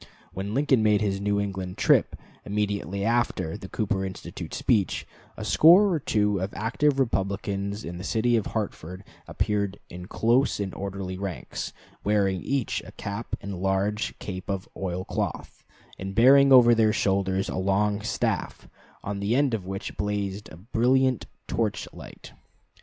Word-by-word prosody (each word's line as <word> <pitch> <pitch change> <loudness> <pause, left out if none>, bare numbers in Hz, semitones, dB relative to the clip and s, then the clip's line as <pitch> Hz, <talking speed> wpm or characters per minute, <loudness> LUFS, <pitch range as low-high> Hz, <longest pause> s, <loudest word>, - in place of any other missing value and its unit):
When 100 +3 -4
Lincoln 135 -4 +3
made 105 -1 +3
his 100 -2 -1
New 100 0 +1
England 95 -2 -4
trip, - - +3 0.3
immediately 100 -2 -2
after 110 -7 0
the 95 -2 -9
Cooper 100 -2 -1
Institute 95 -1 -7
speech, 105 -7 +1 0.3
a - - -5
score 185 +6 +6
or 160 - +1
two 105 -6 +1
of 95 +2 -3
active 135 +6 +1
Republicans 100 -3 -1
in 85 +1 -6
the - - -6
city 120 +3 +1
of 110 - 0
Hartford 95 -4 -5 0.2
appeared 100 -2 -1
in 90 +1 -8
close 120 +6 +2
and 100 -2 -3
orderly 95 -1 -5
ranks, 95 -2 -5 0.3
wearing 100 -3 +1
each 135 -4 -1
a - - -11
cap 100 +3 -5
and 100 -3 -6
large 95 +3 0
cape 95 -1 -7
of 95 -1 -3
oil 95 -1 -3
cloth, - - -4 0.4
and 95 0 -5
bearing 135 +4 +7
over 120 -2 +8
their 110 -2 +3
shoulders 95 -1 +1
a - - -4
long 100 +2 +1
staff, 110 - -2 0.4
on 100 0 -4
the 100 +4 0
end 140 -2 +2
of 100 -5 -3
which 95 +2 -5
blazed 105 -1 -3
a 80 - -11
brilliant 125 +5 +1 0.2
torch - - -1
light. - - -11
100 Hz, 155 wpm, -26 LUFS, 95-115 Hz, 0.4 s, over